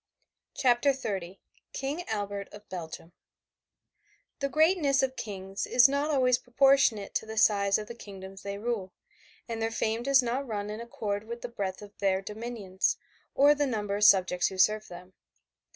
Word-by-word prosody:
CHAPTER 255 +2 +3
XXX 195 -8 -5 0.4
KING 290 +6 -4
ALBERT 205 -2 -3
OF 205 0 -12
BELGIUM 165 -1 -7 1.3
The 275 - -1
greatness 310 -3 +3
of 260 0 -1
kings 195 -4 -5
is 245 +1 +6
not 280 +2 -1
always 255 -4 +3
proportionate 245 -5 +3
to 220 - -2
the 220 0 -7
size 200 -2 +4
of 215 - -5
the 235 - -8
kingdoms 195 -4 -10
they 200 0 -5
rule, 205 -4 -3 0.5
and 230 -1 -4
their 225 - +1
fame 225 0 -1
does 270 +1 +4
not 255 +3 -2
run 210 -2 -3
in 215 +2 -6
accord 215 -3 -4
with 235 +1 -7
the 245 - -4
breadth 195 -4 -4
of 205 0 -13
their 195 -1 +2
dominions, 210 -2 -2 0.4
or 285 +2 +6
the 290 -1 0
number 210 -5 -2
of 205 - -1
subjects 185 -3 +5
who 190 - -6
serve 215 +3 +3
them. 180 +1 -12
215 Hz, 170 wpm, -29 LUFS, 200-250 Hz, 1.3 s, is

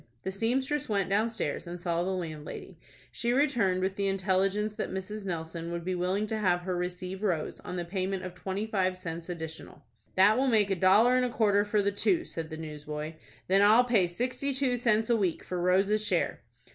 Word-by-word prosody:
The 190 - -2
seamstress 260 +8 -1
went 200 -2 0
downstairs, 210 -7 0
and 175 +1 -6
saw 170 -1 -1
the 180 - -1
landlady. 165 -5 -6 0.3
She 240 0 -1
returned 240 -10 +2
with 190 0 -1
the 200 -1 0
intelligence 195 +2 +1
that 215 - -3
Mrs. 195 +2 -5
Nelson 165 -1 -4
would 170 0 -4
be 185 - -1
willing 185 +4 0
to 220 0 -3
have 180 -4 +2
her 180 0 -2
receive 180 +2 -4
Rose 175 -7 -1
on 180 - -7
the 175 -1 -3
payment 190 +1 -2
of 185 -1 -6
twenty 190 +3 -3
five 185 -4 0
cents 165 -1 -6
additional. 160 -3 -7 0.3
"That 205 +5 +5
will 270 - +2
make 215 -5 +3
a - - +3
dollar 210 +8 +5
and 255 - +2
a - - -1
quarter 205 -3 +3
for 210 0 +1
the 200 - +2
two," 335 - +1
said 160 -1 -6
the 160 - -6
newsboy. 150 0 -6 0.3
"Then 195 +2 +4
I'll 215 +4 +7
pay 225 -7 +3
sixty 255 +8 -2
two 260 -2 +1
cents 225 -2 +2
a - - +5
week 190 -7 0
for 180 -1 -3
Rose's 195 +4 +3
share." - - 0
190 Hz, 205 wpm, -29 LUFS, 175-215 Hz, 0.3 s, I'll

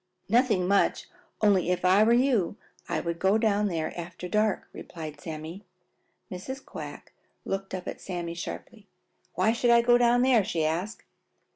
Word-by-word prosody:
"Nothing 220 -5 +2
much, 200 +1 +2 0.3
only 200 -4 +3
if 180 0 0
I 190 +3 +5
were 225 - +4
you 240 -6 +2 0.3
I - - 0
would 170 0 -4
go 195 +3 +3
down 210 -2 +2
there 165 -4 -3
after 175 +1 -7
dark," 210 +1 0
replied 155 -3 -8
Sammy. 160 +5 -7 0.7
Mrs. 260 +9 -7
Quack - - -9 0.3
looked 195 0 -3
up 180 - -7
at - - -6
Sammy 175 -2 -4
sharply. 200 +5 -8 0.5
"Why 185 +5 +3
should 240 +1 +1
I 235 0 +6
go 240 0 +5
down 245 0 +4
there?" 250 -5 +4
she 170 -5 -1
asked. 175 +7 -3
195 Hz, 160 wpm, -27 LUFS, 175-225 Hz, 0.7 s, I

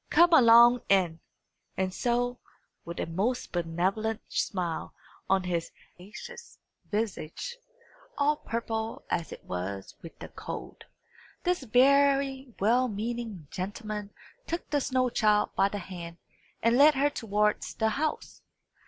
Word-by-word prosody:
Come 345 0 +5
along 240 -3 +8
in." 180 -4 +3 0.6
And 185 -1 -1
so, 245 +2 0 0.5
with 170 0 -6
a - - -1
most 200 +10 -2
benevolent 185 +6 -1
smile 175 -4 -2 0.3
on 190 0 +3
his 175 -2 -2 0.3
sagacious 470 - -11 0.3
visage, 220 - -3 0.6
all 295 +1 +2
purple 225 -2 -4
as 170 -2 -1
it - - -9
was 95 +2 -5
with 165 - -11
the - - -9
cold, - - -8 0.6
this 360 -2 +1
very 270 +1 +3
well 240 +5 +3
meaning 220 -5 -4
gentleman 210 +2 -5 0.4
took 335 +1 -3
the 290 -1 +2
snow 255 -1 +1
child 210 -2 +2
by 195 - +3
the 205 - -4
hand 175 -3 -8 0.5
and 230 +2 +4
led 300 +1 +7
her 285 +2 +2
towards 210 -4 0
the 220 - +1
house. 300 +8 -3
220 Hz, 125 wpm, -28 LUFS, 185-255 Hz, 0.6 s, along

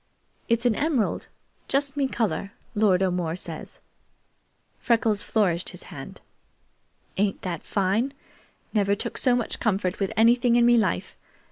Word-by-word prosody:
It's 230 +1 +1
an 240 - +4
emerald 280 -2 0 0.4
just 275 0 0
me 280 -2 +1
color, 205 -5 -2 0.2
Lord 195 -3 +3
O'More 180 -3 -1
says." 185 - -7 1.0
Freckles 225 -3 +3
flourished 185 -6 0
his - - -11
hand. - - -9 1.0
"Ain't 200 0 0
that 175 -4 -3
fine? 205 +7 0 0.6
Never 200 -2 +2
took - - -3
so 250 -2 +3
much 240 -2 -2
comfort 190 -4 0
with 195 0 -1
anything 235 +1 +4
in 240 0 +5
me 240 0 +6
life. 225 -3 0
215 Hz, 135 wpm, -25 LUFS, 195-240 Hz, 1.0 s, me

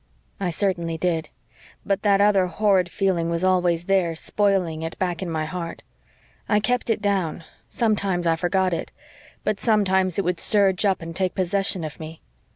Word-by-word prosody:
"I 190 -3 -1
certainly 170 -2 -1
did. 165 -2 -1 0.6
But 195 -1 0
that 200 -1 +3
other 200 -3 +4
horrid 185 0 +2
feeling 175 -3 0
was 170 +1 -1
always 180 -2 +2
there, 185 -4 +1
spoiling 185 -3 0
it, 165 0 -5
back 180 -1 -2
in 185 - -3
my 160 -1 -2
heart. 170 +1 -6 0.7
I 210 - +4
kept 245 +3 0
it 215 -2 0
down 190 -5 -1 0.3
sometimes 200 -6 0
I 165 -1 +3
forgot 185 +2 0
it - - -4 0.5
but 210 -2 -1
sometimes 190 -5 +2
it 200 - 0
would 175 -1 -1
surge 200 -2 +3
up 190 -4 +1
and 165 0 -7
take 185 0 -1
possession 190 -1 -1
of 155 -2 -7
me. 160 0 -8
185 Hz, 170 wpm, -23 LUFS, 170-200 Hz, 0.7 s, other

